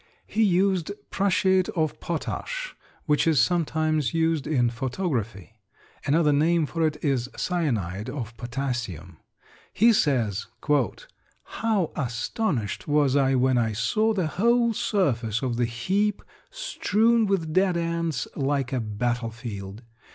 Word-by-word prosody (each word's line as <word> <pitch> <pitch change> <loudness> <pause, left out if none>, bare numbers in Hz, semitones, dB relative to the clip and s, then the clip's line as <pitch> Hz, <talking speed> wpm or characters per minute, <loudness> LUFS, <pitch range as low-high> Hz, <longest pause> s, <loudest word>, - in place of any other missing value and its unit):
He 220 - -1
used 190 -2 +2 0.2
prussiate 190 -1 +2
of 155 -3 -1
potash - - -4 0.3
which 150 0 +2
is 155 -4 +4
sometimes 155 -5 +1
used 160 -3 +1
in 125 -6 +2
photography. 120 - -3 0.5
Another 150 +1 +3
name 160 +3 +3
for 165 +2 0
it 150 -1 -3
is 130 -3 0
cyanide 115 - -1
of 120 -4 -6
potassium. 120 - -4 0.5
He 230 +2 +5
says, 120 - +1 1.0
"How 215 -7 -1
astonished 125 - -2
was 145 -2 +3
I 135 -1 +3
when 130 -1 +3
I 110 -2 0
saw 215 - +1
the 190 -5 0
whole 235 +8 +2
surface 120 - 0
of 120 -3 -1
the 120 - +2
heap 190 - -1 0.3
strewn 235 - +1
with 170 -6 -1
dead 185 -1 +3
ants 170 -2 -1
like 135 -2 -1
a 130 - +1
battle 115 +2 -2
field. 110 -2 -8
150 Hz, 125 wpm, -25 LUFS, 120-185 Hz, 1.0 s, He